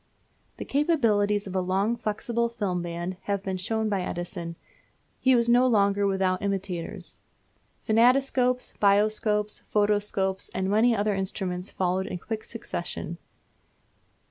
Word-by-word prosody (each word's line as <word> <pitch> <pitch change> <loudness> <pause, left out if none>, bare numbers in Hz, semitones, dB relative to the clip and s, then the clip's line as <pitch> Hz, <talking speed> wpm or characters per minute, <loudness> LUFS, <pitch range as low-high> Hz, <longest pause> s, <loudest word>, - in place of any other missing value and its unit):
The - - -6
capabilities 220 -9 +2
of 190 -1 -6
a 185 - +2
long 195 +5 +1
flexible 235 +1 -1
film 200 -6 -2
band 175 +1 -4
having 200 -1 -1
been 190 -1 -2
shown 220 +4 -1
by 200 -3 0
Edison, 170 -1 -5 0.6
he 260 -1 +4
was 235 -1 +2
not 245 +2 +5
long 200 -4 +4
without 190 -1 +1
imitators. 195 -2 -3 0.7
Phantoscopes, 250 +2 +3
Bioscopes, 210 +1 +2
Photoscopes, 205 -2 +1
and 190 +1 0
many 230 +3 +4
other 210 0 +1
instruments 190 -1 -3
followed 185 +1 -1
in 180 - -4
quick 220 +4 -5
succession. 175 -6 -5
205 Hz, 125 wpm, -26 LUFS, 185-225 Hz, 0.7 s, not